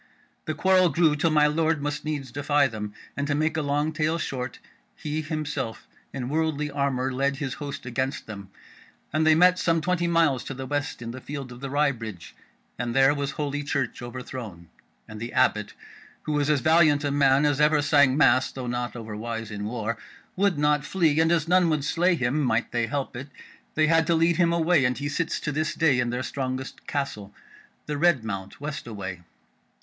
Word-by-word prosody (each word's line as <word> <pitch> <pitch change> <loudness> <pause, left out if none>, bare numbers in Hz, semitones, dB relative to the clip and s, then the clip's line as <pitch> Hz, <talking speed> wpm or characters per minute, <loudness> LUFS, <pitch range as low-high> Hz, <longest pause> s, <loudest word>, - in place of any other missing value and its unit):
The 155 - -2
quarrel 185 +2 +4
grew 155 0 +3
till 155 +3 +1
my 150 -1 +4
Lord 160 +1 +1
must 145 +1 -3
needs 145 -4 -3
defy 145 +1 +2
them, 110 -5 -4 0.2
and 140 0 -2
to 145 - 0
make 155 +2 0
a 160 - 0
long 145 +2 0
tale 155 +1 0
short, 130 -6 -4 0.4
he 155 +1 -3
himself 150 -6 -4 0.2
in 130 -3 -4
worldly 150 0 -1
armour 135 -2 -1
led 140 +2 0
his 135 -2 -4
host 145 -1 -6
against 130 +2 -2
them, 100 -3 -9 0.6
and 155 +1 +2
they 160 - +6
met 180 +2 +5
some 165 -1 +2
twenty 175 +1 0
miles 165 -7 +2
to 135 - -5
the 130 +1 -6
west 145 -2 -3
in 115 - -5
the 130 +2 -8
field 140 -3 -6
of 120 - -10
the 135 +1 -5
Wry 145 +1 +2
Bridge, 110 -8 -8 0.4
and 120 0 -2
there 135 +1 +5
was 140 -1 -2
Holy 145 -1 -2
Church 140 -3 -2
overthrown; 120 -8 -8 0.4
and 110 0 -9
the 120 +2 -5
Abbot, 105 -5 +1 0.5
who 150 -1 0
is 145 0 0
as 150 -3 +2
valiant 155 -2 +4
a 145 - 0
man 140 0 +4
as 145 -1 +2
ever 150 0 +4
sang 145 -2 +4
mass, 130 -3 +4
though 130 -2 -6
not 120 0 -3
over 110 -3 -7
wise 115 0 -5
in 105 0 -5
war, 115 0 -3 0.4
would 195 -3 +2
not 150 -1 +2
flee, 160 -1 +1
and 160 +1 +3
as 165 -2 +1
none 180 -1 +4
would 150 -3 0
slay 175 +3 +2
him, 135 +1 0
might 120 -4 0
they 120 -1 0
help 140 +1 -3
it, 130 +3 -6 0.5
they 155 - +4
had 165 0 +3
to 170 - +3
lead 165 +1 +3
him 170 -2 +3
away, 170 -2 +3
and 125 0 +1
he 145 - -3
sits 165 +3 -1
to 150 - -3
this 155 +1 -1
day 145 -6 +3
in 120 -1 0
their 125 +1 -2
strongest 130 -1 -5
castle, 105 -9 -3 0.5
the 150 -1 -3
Red 155 -7 +3
Mount 100 -3 -6
west 145 -3 -5
away. 95 -5 -6
145 Hz, 205 wpm, -25 LUFS, 125-155 Hz, 0.6 s, they